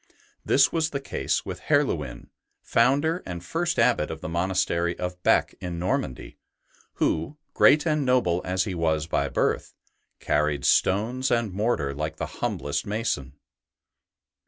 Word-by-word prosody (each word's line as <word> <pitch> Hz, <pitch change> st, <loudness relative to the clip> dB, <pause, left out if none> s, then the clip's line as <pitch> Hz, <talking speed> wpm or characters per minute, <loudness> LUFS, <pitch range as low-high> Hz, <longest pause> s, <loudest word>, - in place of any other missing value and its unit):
This 135 Hz, -2 st, +4 dB
was 160 Hz, -1 st, 0 dB
the 140 Hz, -, -3 dB
case 135 Hz, -, -2 dB
with -, -, -6 dB
Herluin, 80 Hz, -, 0 dB, 0.3 s
founder 145 Hz, +9 st, +2 dB
and 85 Hz, -1 st, -7 dB
first 170 Hz, 0 st, -1 dB
Abbot 115 Hz, -11 st, +3 dB
of 80 Hz, -, -6 dB
the -, -, -6 dB
monastery 85 Hz, 0 st, 0 dB
of 90 Hz, 0 st, -5 dB
Bee -, -, +5 dB, 0.2 s
in 90 Hz, -2 st, -5 dB
Normandy, 85 Hz, -7 st, -3 dB, 0.5 s
who, 80 Hz, -, -1 dB, 0.2 s
great 150 Hz, +3 st, +5 dB
and 155 Hz, -2 st, +1 dB
noble 125 Hz, -10 st, +2 dB
as 95 Hz, +1 st, 0 dB
he 100 Hz, -, -4 dB
was 80 Hz, -3 st, 0 dB
by -, -, -1 dB
birth, -, -, -1 dB, 0.4 s
carried 75 Hz, -1 st, 0 dB
stones 120 Hz, +7 st, +2 dB
and 115 Hz, -5 st, 0 dB
mortar 95 Hz, -9 st, 0 dB
like 75 Hz, +2 st, -4 dB
the -, -, -3 dB, 0.2 s
humblest 70 Hz, 0 st, -1 dB
mason. 100 Hz, -, -2 dB
90 Hz, 140 wpm, -25 LUFS, 80-130 Hz, 0.5 s, Bee